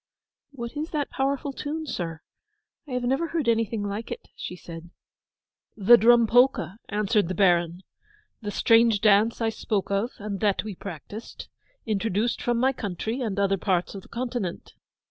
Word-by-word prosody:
'What 235 -2 -7
is 305 +3 -3
that 295 -3 -2
powerful 275 +1 -1
tune, 310 +3 -4
sir—I 280 - -9
have 250 0 -1
never 270 +7 +1
heard 320 -6 -2
anything 225 -2 +1
like 205 +3 -4
it?' - - -7
she 180 - -6
said. 170 -1 -10 0.9
'The 225 +4 +7
Drum 235 +1 +6
Polka,' 245 -4 +3
answered 210 -2 +1
the 185 - -3
Baron. 175 -1 +2 0.6
'The 210 - -4
strange 225 +1 +4
dance 215 +3 +4
I 225 - +2
spoke 210 -3 -2
of 200 +4 +1
and 205 -1 -5
that 205 -3 +1
we 215 -1 -5
practised—introduced 215 - -4
from 240 -1 0
my 260 +3 +2
country 220 +3 -4
and 215 -5 -2
other 195 -1 +2
parts 180 -2 0
of 195 - -7
the - - -18
continent. 235 -7 -4
220 Hz, 155 wpm, -26 LUFS, 195-245 Hz, 0.9 s, The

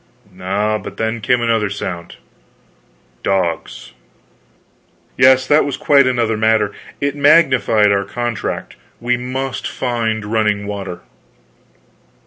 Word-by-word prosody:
Ah, 105 +3 0
but - - -9
then 110 +1 -2
came 125 +1 +1
another 115 -3 +1
sound 90 -4 -6 1.1
dogs! 90 -4 -2 1.2
Yes, 130 0 +5
that 150 +3 +4
was 140 - -3
quite 140 -2 +4
another 120 -3 +1
matter. 110 -1 +2 0.3
It 140 0 -1
magnified 130 -8 +4
our 100 0 +1
contract 120 +2 -4 0.2
we 125 +1 0
must 130 +2 -4
find 115 -4 -2
running 105 -1 0
water. 100 -4 -6
110 Hz, 110 wpm, -17 LUFS, 105-130 Hz, 1.2 s, Yes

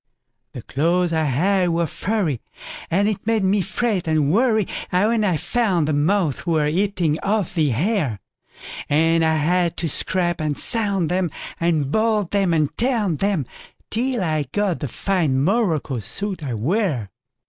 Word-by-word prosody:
The 125 - -8
clothes 170 +4 0
I 160 -1 +1
had 180 +7 +2
were 170 0 +1
furry, 170 - -2 0.5
And 200 +5 +2
it 210 0 -3
made 225 -3 +2
me 195 +1 +2
fret 200 -1 -1
and 155 -1 +2
worryWhen 220 -1 +1
I 185 -6 +1
found 190 -7 0
the 155 - 0
moths 155 +1 +1
were 160 -3 +2
eating 170 -1 0
off 205 -3 0
the 160 -5 +2
hair; 145 - 0 0.7
And 165 +2 +3
I 160 0 +2
had 170 +3 +1
to 170 - -1
scrape 175 +2 -1
and 150 -2 -1
sand 200 -8 +1
'em, 180 -1 +1 0.3
And 165 -3 +1
I - - -5
boiled 215 0 +1
'em 195 -3 +2
and 155 -3 +2
I - - -36
tanned 220 - 0
'em, 195 -9 +1 0.5
Till 240 -1 0
I 155 -3 0
got 205 -4 0
the 145 - -3
fine 160 - 0
morocco 170 - 0
suit 185 - -3
I 130 -5 -3
wear. 140 - -1
175 Hz, 160 wpm, -21 LUFS, 155-205 Hz, 0.7 s, And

